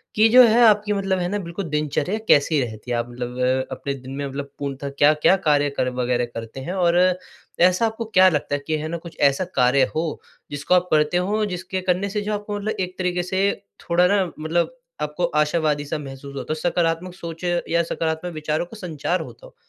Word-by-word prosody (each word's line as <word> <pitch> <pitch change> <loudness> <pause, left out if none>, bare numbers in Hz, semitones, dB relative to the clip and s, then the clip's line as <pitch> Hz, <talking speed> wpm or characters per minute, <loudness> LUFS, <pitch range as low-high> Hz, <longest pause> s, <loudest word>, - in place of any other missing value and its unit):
कि 220 +1 +6
जो 250 +2 +9
है 230 +2 +4
आपकी 210 -1 +3
मतलब 195 -2 0
है 175 - -1
ना 205 +2 -1
बिल्कुल 175 +1 -5
दिनचर्या 150 +7 -1
कैसी 145 0 +4
रहती 115 0 -6
है, 120 - +1
आप 120 +1 -3
मतलब 125 +2 -1
अपने 140 - -4
दिन 130 -1 -10
में 140 0 -3
मतलब 140 +1 -6
पूर्णतः 140 0 -4
क्या-क्या 150 +5 +5
कार्य, 145 -5 +2
कर्म 130 -2 -2
वग़ैरह 125 0 +1
करते 115 +3 -7
हैं? 165 +7 -5
और 175 -2 +2 0.6
ऐसा 185 +5 +4
आपको 225 +1 -3
क्या 185 -4 +5
लगता 150 -3 -1
है - - -2
कि 155 - 0
है 155 +1 -4
ना 170 +2 -3
कुछ 170 0 -12
ऐसा 140 +5 +3
कार्य 125 +2 +4
हो 160 0 -2 0.3
जिसको 145 +4 -1
आप 180 0 +3
करते 155 +3 +3
हों, 210 +4 0
जिसके 185 -1 -4
करने 185 +2 0
से 210 +1 -2
जो 210 +1 -2
आपको 205 0 -4
मतलब 215 +2 -2
एक 185 0 -3
तरीके 180 -1 -1
से 190 +2 +1 0.3
थोड़ा 175 0 +2
ना 200 +1 +3 0.2
मतलब 170 +9 -1 0.3
आपको 150 +4 -1
आशावादी-सा 150 -1 0
महसूस 140 -1 -9
होता 140 - -5
हो, - - 0
सकारात्मक 170 +1 -1
सोच 170 -2 -8 0.3
या 170 +1 +2
सकारात्मक 165 +1 -3
विचारों 155 +1 -2
का 220 +6 -12
संचार 175 -1 -2
होता - - -11
हो? - - -16
165 Hz, 205 wpm, -22 LUFS, 145-185 Hz, 0.6 s, जो